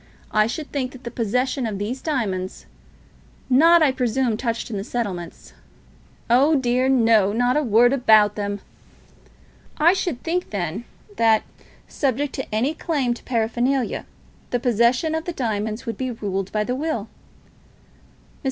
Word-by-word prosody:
I 215 Hz, 0 st, +3 dB
should 300 Hz, +5 st, -5 dB
think 260 Hz, -3 st, -3 dB
that 260 Hz, 0 st, -13 dB
the 235 Hz, -, -6 dB
possession 250 Hz, +3 st, -1 dB
of 210 Hz, -3 st, -4 dB
these 220 Hz, +6 st, -4 dB
diamonds, 200 Hz, -, -3 dB, 0.9 s
not, 330 Hz, +5 st, +6 dB
I 285 Hz, -, +4 dB
presume, 250 Hz, -2 st, 0 dB
touched 230 Hz, +1 st, -3 dB
on -, -, -5 dB
in -, -, -2 dB
the -, -, -4 dB
settlements 195 Hz, -8 st, -5 dB, 0.4 s
" -, -, -29 dB, 0.3 s
"Oh 270 Hz, +7 st, +4 dB
dear 255 Hz, -1 st, +1 dB
no; 225 Hz, -6 st, +4 dB
not 245 Hz, +2 st, +2 dB
a 300 Hz, -, +3 dB
word 240 Hz, 0 st, +4 dB
about 220 Hz, -6 st, +5 dB
them." 205 Hz, -1 st, -4 dB, 1.2 s
"I 335 Hz, +4 st, +5 dB
should 345 Hz, -9 st, -3 dB
think, 350 Hz, +2 st, -2 dB
then, 195 Hz, +2 st, -3 dB, 0.3 s
that, 225 Hz, -1 st, +4 dB, 0.4 s
subject 275 Hz, 0 st, -1 dB
to 260 Hz, -5 st, -5 dB
any 255 Hz, +8 st, +1 dB
claim 285 Hz, -7 st, -1 dB
for 235 Hz, -, -11 dB
paraphernalia, 240 Hz, +2 st, -1 dB, 0.4 s
the 245 Hz, -, 0 dB
possession 245 Hz, +6 st, +2 dB
of 320 Hz, 0 st, -2 dB
the 350 Hz, -, -4 dB
diamonds 220 Hz, -4 st, -3 dB
would 225 Hz, -3 st, -5 dB
be 255 Hz, -, -2 dB
ruled 195 Hz, -5 st, -3 dB
by 210 Hz, 0 st, 0 dB
the 245 Hz, -, -2 dB
will." 275 Hz, -5 st, -2 dB
Mr. -, -, -14 dB
240 Hz, 160 wpm, -22 LUFS, 215-265 Hz, 1.2 s, not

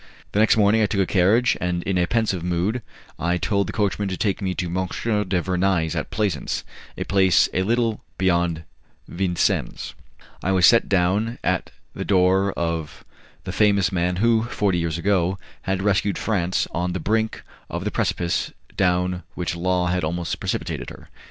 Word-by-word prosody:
The 105 Hz, -, 0 dB
next 110 Hz, +1 st, +4 dB
morning 105 Hz, +1 st, +4 dB
I 105 Hz, -, +3 dB
took 100 Hz, -1 st, 0 dB
a -, -, +2 dB
carriage, 105 Hz, +7 st, +3 dB
and 90 Hz, -1 st, -1 dB
in 95 Hz, -2 st, 0 dB
a 90 Hz, -, +2 dB
pensive 110 Hz, -7 st, 0 dB
mood 90 Hz, +7 st, -1 dB, 0.4 s
I 85 Hz, +1 st, +1 dB
told 100 Hz, +3 st, 0 dB
the -, -, -3 dB
coachman 105 Hz, -1 st, 0 dB
to 95 Hz, -1 st, -3 dB
take 100 Hz, -1 st, -1 dB
me 95 Hz, -2 st, -1 dB
to 90 Hz, -, -2 dB
M. 85 Hz, -, -5 dB, 0.5 s
du 90 Hz, -1 st, +1 dB
Vernai's, 90 Hz, -3 st, +1 dB
at -, -, -3 dB
Plaisance 100 Hz, -8 st, -1 dB, 0.3 s
a -, -, -2 dB
place 95 Hz, -2 st, +4 dB
a 95 Hz, -, +1 dB
little 115 Hz, +2 st, 0 dB
beyond 85 Hz, -3 st, +1 dB, 0.4 s
Vincennes. 90 Hz, -1 st, -1 dB, 0.5 s
I 95 Hz, -, 0 dB
was 90 Hz, -2 st, +5 dB
set 115 Hz, +6 st, +5 dB
down 100 Hz, +5 st, +1 dB
at 90 Hz, -2 st, 0 dB, 0.2 s
the -, -, -4 dB
door 95 Hz, +1 st, +3 dB
of 85 Hz, -3 st, -3 dB, 0.4 s
the -, -, -5 dB
famous 100 Hz, -3 st, +3 dB
man 90 Hz, -1 st, 0 dB
who, 115 Hz, +3 st, +3 dB
forty 100 Hz, -6 st, 0 dB
years 85 Hz, -1 st, -1 dB
ago, 95 Hz, 0 st, +1 dB, 0.2 s
had 95 Hz, 0 st, -2 dB
rescued 100 Hz, 0 st, +1 dB
France 95 Hz, -5 st, 0 dB
on 90 Hz, +1 st, -2 dB
the 95 Hz, -, -2 dB
brink 110 Hz, +5 st, -1 dB, 0.3 s
of -, -, -4 dB
the -, -, -1 dB
precipice 85 Hz, -1 st, -1 dB, 0.2 s
down 90 Hz, -1 st, +1 dB
which 90 Hz, 0 st, -2 dB
Law 90 Hz, +1 st, 0 dB
had 90 Hz, 0 st, 0 dB
almost 85 Hz, +2 st, -2 dB
precipitated -, -, -3 dB
her. -, -, -13 dB
95 Hz, 175 wpm, -23 LUFS, 90-100 Hz, 0.5 s, was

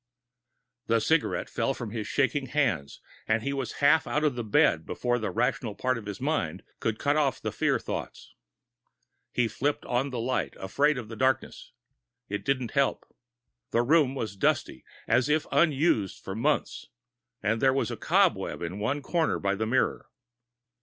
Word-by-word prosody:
_ -, -, -48 dB
The 115 Hz, 0 st, +3 dB
cigarette 160 Hz, +8 st, +1 dB
fell 135 Hz, -, -1 dB
from 115 Hz, -4 st, -6 dB
his 110 Hz, -2 st, -4 dB
shaking 140 Hz, 0 st, 0 dB
hands, 115 Hz, -, -1 dB, 0.3 s
and 110 Hz, 0 st, +1 dB
he 140 Hz, -, -1 dB
was 135 Hz, -4 st, -3 dB
half 160 Hz, +2 st, +5 dB
out 150 Hz, -, 0 dB
of 150 Hz, -3 st, +2 dB
the 120 Hz, -1 st, -4 dB
bed 90 Hz, -6 st, +3 dB
before 120 Hz, +8 st, -1 dB
the 110 Hz, -, -2 dB
rational 115 Hz, -2 st, -1 dB
part 130 Hz, +4 st, 0 dB
of 105 Hz, -, -11 dB
his 105 Hz, -1 st, -5 dB
mind 95 Hz, -, -1 dB, 0.2 s
could 110 Hz, -1 st, -1 dB
cut 145 Hz, +5 st, +1 dB
off 135 Hz, -4 st, +1 dB
the -, -, -3 dB
fear -, -, +1 dB
thoughts. -, -, -6 dB, 1.0 s
He 120 Hz, -2 st, +1 dB
flipped 145 Hz, +6 st, -2 dB
on 125 Hz, +3 st, 0 dB
the 125 Hz, -, -5 dB
lights, 125 Hz, +3 st, -2 dB
afraid 140 Hz, +10 st, +1 dB
of 120 Hz, -3 st, -5 dB
the 115 Hz, -, -8 dB
dimness. 130 Hz, +3 st, -1 dB, 0.6 s
It 100 Hz, +1 st, -3 dB
didn't 130 Hz, -4 st, -1 dB
help. 140 Hz, -1 st, 0 dB, 0.5 s
The 120 Hz, -, +2 dB
room 140 Hz, 0 st, +3 dB
was 110 Hz, -6 st, -4 dB
dusty, 65 Hz, -8 st, 0 dB, 0.2 s
as 130 Hz, +3 st, +3 dB
if 155 Hz, +1 st, +2 dB
unused 145 Hz, -, +2 dB
for 95 Hz, -, -5 dB
months, 110 Hz, +4 st, -1 dB, 0.6 s
and 110 Hz, +2 st, +1 dB
there 135 Hz, -, +5 dB
was 130 Hz, -4 st, 0 dB
a -, -, -3 dB
cobweb -, -, +1 dB
in 100 Hz, -, -4 dB
one 135 Hz, +7 st, -1 dB
corner 165 Hz, +2 st, +1 dB
by 100 Hz, 0 st, 0 dB
the 110 Hz, +2 st, -2 dB
mirror. 130 Hz, +3 st, 0 dB
125 Hz, 175 wpm, -28 LUFS, 110-140 Hz, 1.0 s, half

